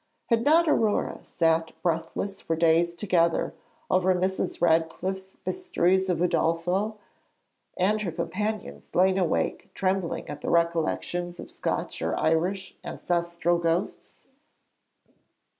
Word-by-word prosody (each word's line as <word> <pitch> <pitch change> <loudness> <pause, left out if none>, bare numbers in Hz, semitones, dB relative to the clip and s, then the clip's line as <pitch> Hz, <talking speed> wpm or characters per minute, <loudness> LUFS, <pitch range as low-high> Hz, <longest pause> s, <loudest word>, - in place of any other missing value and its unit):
Had 230 0 +3
not 325 +4 +5
Aurore 220 -8 +1
sat 165 -1 0
breathless 170 +4 -2
for 165 - -1
days 170 +1 +3
together 170 -2 +1 0.4
over 185 0 +3
Mrs. 185 +1 -1
Radcliffe's 175 +3 0
Mysteries 190 - +1
of 180 - +2
Udolpho, 180 +5 +1 0.8
and 210 +4 +2
her 185 -5 -2
companions 210 +7 -4
lain 190 +1 +4
awake 175 -4 0
trembling 190 -2 -1
at 145 - -7
the - - -3
recollections 170 +1 0
of - - -8
Scotch - - -3
or 80 0 -1
Irish 175 +5 0
ancestral 170 0 -1
ghosts? 170 +3 -2
175 Hz, 110 wpm, -27 LUFS, 165-190 Hz, 0.8 s, not